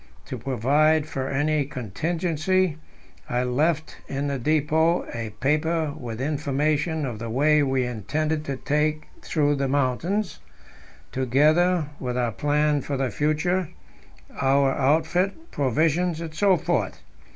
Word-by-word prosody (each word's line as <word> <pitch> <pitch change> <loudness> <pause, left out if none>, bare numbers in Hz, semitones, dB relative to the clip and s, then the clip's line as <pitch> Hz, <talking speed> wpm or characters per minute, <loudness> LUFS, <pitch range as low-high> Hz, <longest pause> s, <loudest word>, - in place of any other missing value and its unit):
To 130 - -5
provide 145 +6 +2
for 135 -3 -4
any 145 +2 +1
contingency, 160 - -1 0.5
I 125 0 0
left 155 +6 0
in 140 +1 -3
the 140 -1 -2
depot 155 +4 +2
a 115 -2 -4
paper 155 +2 +1
with 115 -2 -6
information 150 +2 0
of 120 -5 -5
the 115 0 -5
way 150 +6 +3
we 135 -2 +1
intended 150 +7 -2
to 140 -2 -3
take 150 +2 -1
through 145 -2 +1
the 135 0 0
mountains, 145 +10 0 0.7
together 150 +6 +2
with 125 -1 -3
our 120 -2 0
plan 150 +3 +1
for 140 +1 -3
the 130 -3 -1
future, 155 - 0 0.7
our 135 0 +3
outfit, 165 - 0
provisions, 160 +5 +1
etc. 170 +2 +1
150 Hz, 120 wpm, -24 LUFS, 135-160 Hz, 0.7 s, way